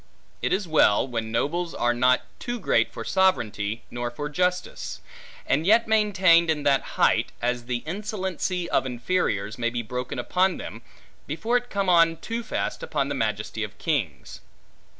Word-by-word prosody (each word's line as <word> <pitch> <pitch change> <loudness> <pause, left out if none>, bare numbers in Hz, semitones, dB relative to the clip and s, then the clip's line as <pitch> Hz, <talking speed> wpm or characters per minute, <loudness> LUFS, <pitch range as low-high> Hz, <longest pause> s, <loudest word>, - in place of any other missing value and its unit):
It - - 0
is 195 -2 0
well, 135 -7 +4
when 115 -3 -3
nobles 165 +9 -1
are 120 0 +1
not 125 +1 +3 0.2
too 240 -1 -4
great - - +2
for - - -6
sovereignty 115 - +1
nor 120 0 -3
for 145 +5 -5
justice; 180 +3 -2 0.5
and 150 - +1
yet 225 +2 +5
maintained 190 -6 +4
in 150 -2 0
that 140 -2 +3 0.2
height, - - +3
as 120 0 -1
the 120 -1 -3
insolency 185 -1 -3
of - - +1
inferiors 120 - -1
may 120 0 +1
be 120 0 -3
broken 125 +3 -4
upon 180 +9 +1
them, 115 - -8 0.5
before 220 +11 -1
it 245 0 0
come 200 -1 -1
on 165 -2 +5
too 230 +6 -4
fast 230 - -3
upon 485 - -1
the - - -1
majesty - - -2
of - - -7
kings. - - -3
160 Hz, 165 wpm, -25 LUFS, 120-190 Hz, 0.5 s, yet